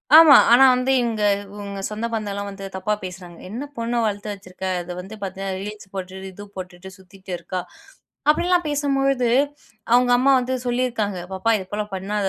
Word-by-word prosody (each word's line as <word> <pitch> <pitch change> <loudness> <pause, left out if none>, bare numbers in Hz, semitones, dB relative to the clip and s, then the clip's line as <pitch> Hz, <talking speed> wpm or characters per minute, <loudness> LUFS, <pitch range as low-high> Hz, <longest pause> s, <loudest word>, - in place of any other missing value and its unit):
ஆமா, 315 -3 +10 0.2
ஆனா 245 +3 +8
வந்து 250 +1 +1
இவங்க 230 -3 -1 0.3
இவங்க 200 -1 -6
சொந்த 215 +2 -3
பந்தலாம் 200 -2 -3
வந்து 195 0 -8
தப்பா 190 +3 -1
பேசுறாங்க. 180 -2 -8
என்ன 235 +7 -5
பொண்ண 235 +1 -1
வளர்த்து 210 0 -2
வச்சிருக்க? 190 -1 -9 0.2
அது 175 - -8
வந்து 195 +4 -8
பாத்தீங்கன்னா, 195 0 -4
ரீல்ஸ் 210 -1 -8
போட்டுட்டு, 190 0 -6
இது 205 +3 -10
போட்டுட்டு 185 0 -8
சுத்திட்டு 190 0 -13
இருக்கா? 180 +2 -4 0.7
அப்படிலாம் 350 +2 +3
பேசும் 285 -1 0
பொழுது, 270 -3 +2 0.6
அவங்க 245 0 +5
அம்மா 275 +2 +4
வந்து 255 +1 -1
சொல்லி 245 +1 +1
இருக்காங்க. 205 -5 -2
பாப்பா, 190 +5 +1
இது 190 - -7
போல 210 0 -2
பண்ணாத, 200 +1 -1
205 Hz, 170 wpm, -22 LUFS, 190-245 Hz, 0.7 s, ஆமா